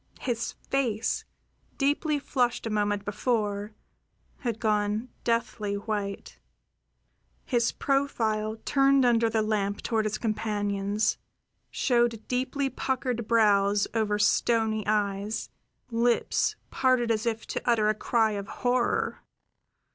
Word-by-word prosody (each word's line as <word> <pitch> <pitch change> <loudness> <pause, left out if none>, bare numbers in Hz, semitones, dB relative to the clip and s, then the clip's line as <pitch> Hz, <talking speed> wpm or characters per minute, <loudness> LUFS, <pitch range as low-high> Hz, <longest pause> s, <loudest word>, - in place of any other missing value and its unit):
His 235 -2 -2
face, 240 -6 -1 0.5
deeply 295 +2 +1
flushed 245 -4 0
a 225 - -2
moment 205 -1 0
before, 210 -1 -1 0.6
had 235 -4 -3
gone 215 +1 0
deathly 225 -3 -1
white; 200 -1 -4 1.1
his 235 -3 +1
profile, 225 -6 0
turned 275 -1 +4
under 230 -1 +3
the 220 -1 +1
lamp 205 -2 -1
toward 220 -2 0
his 215 - -1
companions, 210 -1 -1 0.5
showed 235 -3 +1
deeply 260 +2 -1
puckered 255 -3 -2
brows 205 -3 +4
over 215 -2 +1
stony 220 +1 +2
eyes, 205 0 -1 0.4
lips 235 +1 +1 0.2
parted 255 -3 +2
as 225 +1 0
if 225 -1 -2
to - - -4
utter 220 -3 +3
a 215 - +3
cry 220 +1 +1
of 200 -1 -4
horror. 245 +2 0
220 Hz, 110 wpm, -27 LUFS, 210-240 Hz, 1.1 s, turned